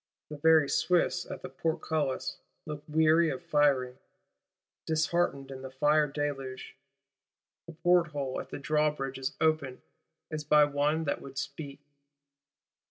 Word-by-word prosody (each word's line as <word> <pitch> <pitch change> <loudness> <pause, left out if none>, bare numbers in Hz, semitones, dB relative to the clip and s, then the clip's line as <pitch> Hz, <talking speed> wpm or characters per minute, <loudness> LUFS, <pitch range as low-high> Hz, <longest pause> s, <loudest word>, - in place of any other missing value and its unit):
The 150 - -6
very 160 -1 +5
Swiss 170 +3 +1
at - - -7
the - - -6
Portcullis 155 -4 -2 0.3
look 150 -1 -6
weary 160 +2 +4
of 175 - -5
firing; 140 -6 +2 0.9
disheartened 155 -3 0
in 130 -1 -8
the 130 - -7
fire 150 +3 +3
deluge: 135 -2 -4 0.9
a 170 - -9
porthole 160 -6 +1
at - - -12
the - - -6
drawbridge 145 -2 -1
is 130 - -3
opened, 155 -5 0 0.5
as 155 -1 -3
by 150 0 +5
one 145 +2 0
that 140 - -2
would 135 0 -11
speak. 140 0 -6
150 Hz, 130 wpm, -30 LUFS, 140-160 Hz, 0.9 s, very